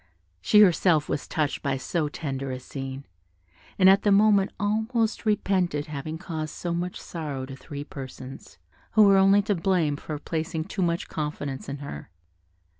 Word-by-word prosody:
She 210 - +6
herself 170 -5 +4
was 145 - -3
touched 150 -2 -1
by 140 -2 -1
so 150 +3 -1
tender 135 -3 -4
a 130 -1 -4
scene, 135 +1 -7 0.7
and 185 - +6
at 195 +1 +7
the 205 - +2
moment 200 -1 +5
almost 220 +2 0
repented 185 -8 +1
having 155 +1 -5
caused 160 -3 -5
so 175 -1 -3
much 175 +1 -3
sorrow 145 -6 -5
to 135 0 -8
three 145 +1 -7
persons, 135 - -10 0.4
who 220 - +7
were 200 -1 +6
only 195 +1 +5
to 210 0 +1
blame 170 -5 +1
for 150 0 -5
placing 160 +1 -3
too 190 - -5
much 170 -1 0
confidence 145 -3 -4
in 140 - -4
her. 75 - -8
160 Hz, 165 wpm, -26 LUFS, 145-195 Hz, 0.7 s, at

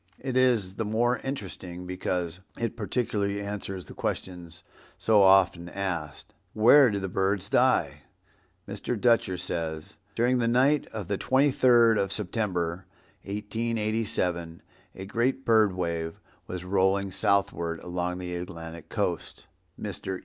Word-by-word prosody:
It 130 -1 -4
is 120 -7 +3
the 110 - -3
more 120 +3 +1
interesting 95 -8 -6
because 90 -1 -3 0.2
it 115 -2 -2
partially 105 -2 -1
answers 100 -2 -5
the - - -11
question 90 -2 -4 0.5
so 110 -2 +4
often 95 -3 +4
asked, 85 -6 -4 0.2
"Where 125 +5 +7
do 100 - -1
the 95 -1 -3
birds 95 +1 -1
die?" 130 +1 +2 0.7
Mr. 105 +3 -3
Dutcher 115 -5 +3
says, 80 -3 -4 0.2
"During 125 +2 +2
the 115 - +1
night 130 +5 +3
of 105 -5 -6
the 100 0 -2
twenty 135 +2 +3
third 120 -4 +5
of 100 -1 -1
September, 95 -4 -2 0.4
1887, 105 -5 -2 0.3
a 95 - -7
great 120 +6 -1
bird 110 -4 +4
wave 85 -2 -3 0.3
was 90 0 -6
rolling 95 +1 +1
southward 95 -4 0
along 90 0 -3
the 90 -1 -5
Atlantic 85 -2 -7
coast. - - -3 0.3
Mr. 95 -1 -4
100 Hz, 130 wpm, -27 LUFS, 90-115 Hz, 0.7 s, Where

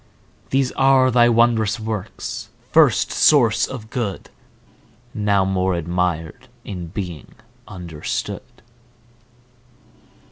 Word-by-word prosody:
These 135 -1 +1
are 135 -1 +4
thy 120 0 +5
wondrous 115 -2 +2
works, 110 -3 -5 0.2
first - - +4
source 120 -7 +4
of 115 -4 -9
Good! 110 -8 -4 0.8
Now 100 -2 +1
more 95 -1 0
admir'd 85 0 -2 0.2
in 90 -4 -6
being 90 - -7 0.3
understood. 85 -5 -5
105 Hz, 85 wpm, -21 LUFS, 90-120 Hz, 0.8 s, thy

